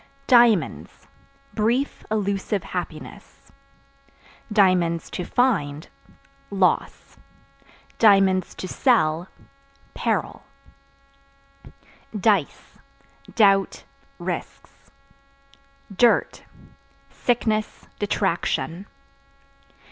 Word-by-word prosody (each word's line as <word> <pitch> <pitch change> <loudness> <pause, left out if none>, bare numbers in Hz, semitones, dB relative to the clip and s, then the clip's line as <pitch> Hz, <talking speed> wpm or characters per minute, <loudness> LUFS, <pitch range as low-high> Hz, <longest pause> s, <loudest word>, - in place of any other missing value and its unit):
Diamonds 235 - +2 0.5
Brief, 235 +6 -1
illusive 200 -1 -2
happiness; 175 -4 -8 1.0
(to 180 -4 +1
find) 170 - 0 0.6
loss; 190 -2 -1 0.8
(to 195 -3 +3
sell) 175 - +1 0.7
peril. - - -2 1.8
Dice 195 -7 0 0.6
Doubt, 195 -3 +3 0.3
risks. - - -7 1.1
Dirt 240 +3 +2 0.7
Sickness, 220 -3 -2
detraction. 190 -2 -2
195 Hz, 50 wpm, -23 LUFS, 180-220 Hz, 1.8 s, to